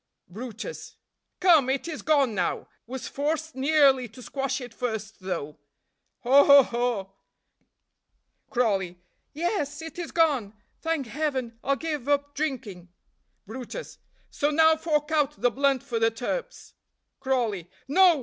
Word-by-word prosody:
brutus. 235 - -8 0.4
"Come, 325 -8 +5
it 270 +4 -1
is 315 -3 -5
gone 280 -6 +3
now; 180 -4 -1 0.2
was 260 +1 -6
forced 315 +2 -2
nearly 270 -2 +4
to 245 +4 -13
squash 270 +1 -2
it 245 -3 -9
first, 220 -4 -4
though, 155 -6 -5 0.6
haw! 270 +3 +7
haw! 280 -1 +8
haw!" 235 -6 -2 1.4
Crawley. 195 -7 0 0.3
"Yes, 315 -2 -2
it 325 +2 -8
is 345 - -5
gone. 275 -11 +2 0.3
Thank 325 -4 -1
Heaven 255 -3 -3
I'll 275 - +2
give 295 -3 -4
up 285 0 +1
drinking." 240 - -4 0.6
brutus. 255 - -8 0.3
"So 290 - 0
now 320 +1 +5
fork 310 -1 -1
out 300 -4 +1
the 245 - +3
blunt 275 0 +1
for 245 -4 -2
the 225 0 +4
turps." 365 - -5 0.5
Crawley. 235 - -1 0.2
"No! 350 +2 +5
270 Hz, 130 wpm, -26 LUFS, 230-305 Hz, 1.4 s, haw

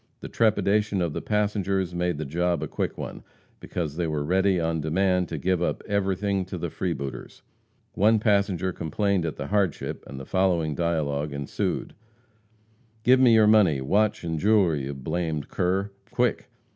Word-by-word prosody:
The - - -7
trepidation 105 -2 +2
of 85 -4 -1
the - - -3
passengers 100 -3 0
made 90 -2 -1
the 80 - -4
job 85 +4 0
a - - -3
quick - - -3
one, - - -6 0.4
because 80 -5 -4
they 85 0 -1
were 75 -2 -1
ready 95 +3 +2
on 80 -1 -1
demand 90 +3 +1
to 80 - -4
give 90 +3 0
up 85 - -1
everything 100 -1 0
to 95 0 -6
the 85 -1 -4
freebooters. 70 -8 -5 0.5
One 110 +4 +4
passenger 100 -4 +1
complained 95 +2 -1
at 80 - -4
the - - -5
hardship, 100 -6 -1
and 65 - -8
the 65 - -8
following 85 -4 +1
dialogue 75 -3 -1
ensued: 70 0 -3 1.1
"Give 130 +3 +5
me 125 -3 +6
your 110 -1 +6
money, 105 -9 +5
watch 100 +12 +1
and 80 -2 -2
jewelry, 95 -8 +3
you 70 +1 -5
blamed 75 +2 -3
cur! 95 +3 0 0.2
quick!" - - 0
90 Hz, 165 wpm, -25 LUFS, 80-100 Hz, 1.1 s, me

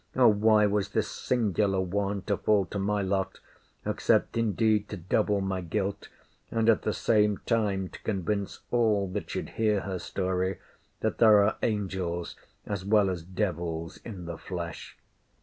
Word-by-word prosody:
Or, 125 -2 +6
why 105 0 +4
was 105 -1 0
this - - -1
singular 105 -5 0
one 100 +1 -1
to 100 - 0
fall 100 -1 +2
to 100 - -2
my 100 +1 0
lot? 95 0 -1 0.5
except - - +1
indeed 110 -1 +1
to 105 - -5
double 100 +3 +1
my 95 -1 -2
guilt; 100 +3 -3 0.4
and 115 -1 0
at 115 - +4
the 105 - 0
same 105 -2 +2
time 105 -5 +1
to - - -12
convince 100 -1 -2
all 110 -5 +2
that 100 +2 -4
should - - -4
hear 105 -3 +3
her 95 -2 -4
story, 95 0 -1 0.4
that - - -1
there 105 -3 +7
are 100 - +1
angels 95 -5 -2 0.3
as 100 -3 -3
well 100 -1 +3
as 90 -2 -4
devils 85 -3 -3
in 95 -7 -7
the 85 -1 -6
flesh? 85 -3 -6
100 Hz, 160 wpm, -28 LUFS, 95-105 Hz, 0.5 s, there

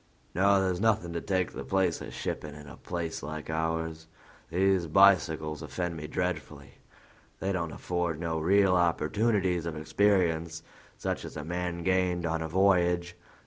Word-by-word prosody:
No, 100 +3 +4
there's 95 -1 0
nothing 105 -6 +1
to 85 - -3
take 95 -2 0
the 65 - -6
place 95 +1 0
of - - -7
shipping 75 -1 -5
in 75 0 -11
a 70 - -10
place 85 -2 -4
like 75 +2 -6
ours. 80 0 -2 0.4
These 95 0 +2
bicycles 80 -4 +4
offend 90 -2 -3
me 75 -1 -6
dreadfully; 90 0 -4 0.6
they 95 - -1
don't 85 -4 -2
afford 85 0 -2
no 80 -1 -2
real 95 +3 +4
opportunities 90 +1 +1
of 80 -2 -4
experience 85 -2 +1 0.3
such - - -3
as - - -8
a 75 - -5
man 90 0 -3
gained 90 -2 +1
on 80 0 -1
a 80 - -2
voyage. 90 -1 +2
85 Hz, 155 wpm, -29 LUFS, 80-95 Hz, 0.6 s, No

